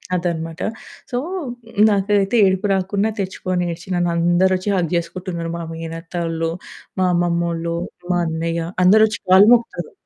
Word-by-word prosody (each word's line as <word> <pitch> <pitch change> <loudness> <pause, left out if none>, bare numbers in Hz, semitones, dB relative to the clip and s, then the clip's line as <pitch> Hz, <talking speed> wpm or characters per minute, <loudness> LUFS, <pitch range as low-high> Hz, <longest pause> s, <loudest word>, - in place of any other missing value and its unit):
అదనమాట. 165 -2 -3 0.5
సో, 245 - -1 0.7
నాకేదైతే 200 +1 +1
ఏడుపు 190 +2 +1
రాకున్నా 195 +3 0
తెచ్చుకొని 185 -2 -2
ఏడ్చి 170 +2 -12
నన్నందరొచ్చి 175 +2 +2
హగ్ 175 -4 0
జేసుకుంటున్నారు 170 0 -3
మా 170 - -5
మేనత్తోళ్ళు, 165 0 -4 0.5
మా 185 - +3
అమ్మమ్మోళ్ళు, 170 -1 0 0.4
మా 175 - +2
అన్నయ్య 165 +1 -2 0.2
అందరొచ్చి 215 +3 +5
కాళ్ళు 190 +3 +7
మొక్కుతారు. 230 -8 -1
175 Hz, 115 wpm, -20 LUFS, 170-190 Hz, 0.7 s, కాళ్ళు